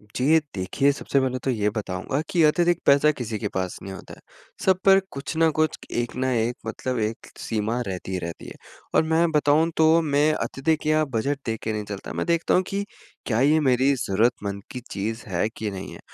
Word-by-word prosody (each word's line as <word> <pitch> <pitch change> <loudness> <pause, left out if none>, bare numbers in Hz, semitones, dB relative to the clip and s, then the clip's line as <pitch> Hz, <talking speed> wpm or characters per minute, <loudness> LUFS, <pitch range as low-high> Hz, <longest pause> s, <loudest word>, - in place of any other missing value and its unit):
जी, 125 - 0
ये 160 - +7 0.2
देखिए, 100 +10 +1
सबसे 140 0 0
पहले 130 -1 -1
तो 135 - +1
ये 105 -3 +1
बताऊँगा 105 +5 -3
कि 175 -4 +2
अतिरिक्त 175 +2 +3
पैसा 140 +2 +5
किसी 115 -6 -4
के 105 - -2
पास 95 -1 -2
नहीं 95 0 -7
होता - - -10
है। - - -13 0.5
सब 190 -1 +4
पर 195 0 +7
कुछ 140 +3 -5
न 165 0 +4
कुछ 155 -1 +1
एक 120 0 -2
न 130 - -2
एक 115 +1 0
मतलब 125 +2 -3
एक 110 +1 -3
सीमा 110 +2 -2
रहती 95 0 -5
ही 95 - -1
रहती 85 -1 -7
है। - - -8 0.4
और - - +5
मैं 165 +1 +3
बताऊँ 150 +2 +3
तो 160 +1 +5
मैं 150 0 +2
अत्यधिक 155 +2 -1
या 155 0 +3
बजट 140 +5 0
देख 115 -1 -2
के 110 - -1
नहीं 105 -1 -3
चलता। 100 -2 -6
मैं - - -2
देखता 170 -1 +1
हूँ 185 - +4
कि 200 +1 -1 0.4
क्या 110 -2 0
ये 150 +3 +4
मेरी 130 0 +3
ज़रूरतमंद 100 -3 0
की 125 - -5
चीज़ 110 +3 -3
है 95 +3 0
कि 105 -2 -3
नहीं 95 0 -7
है? - - -11
130 Hz, 215 wpm, -24 LUFS, 105-155 Hz, 0.5 s, ये